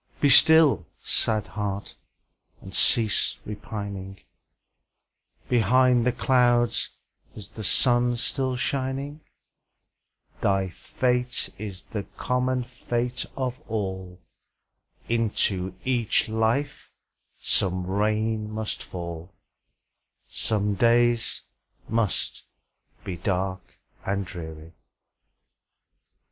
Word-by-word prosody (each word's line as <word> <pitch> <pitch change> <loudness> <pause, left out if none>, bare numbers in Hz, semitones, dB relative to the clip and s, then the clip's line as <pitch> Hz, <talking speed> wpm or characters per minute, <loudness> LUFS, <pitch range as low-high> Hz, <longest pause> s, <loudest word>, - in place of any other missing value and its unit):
Be 145 - +4
still, 160 -1 +6 0.2
sad 110 -2 +1
heart! 100 -1 -4 0.7
and 95 - -11
cease 110 0 +3
repining; 100 -2 -6 1.3
Behind 125 +1 +4
the - - +4
clouds 120 -2 +2 0.5
is 105 -2 -8
the 110 - -7
sun 120 +3 +3
still 130 +1 -1
shining; 135 +3 -2 1.2
Thy 95 -1 +1
fate 125 +6 -1
is 100 -3 -6
the 105 -3 -5
common 125 0 0
fate 120 0 -3
of 130 -1 -2
all, 95 -4 -4 0.9
Into 100 -5 0
each 120 -3 +2
life 115 +6 -1 0.5
some 95 -2 +1
rain 105 +2 0
must 110 0 -3
fall, 85 0 -7 1.0
Some 105 -2 0
days 120 +2 +2 0.4
must 115 -3 0 0.6
be 90 -2 -5
dark 95 0 -3 0.3
and 100 0 -1
dreary. 80 -3 -9
110 Hz, 85 wpm, -25 LUFS, 95-125 Hz, 1.3 s, still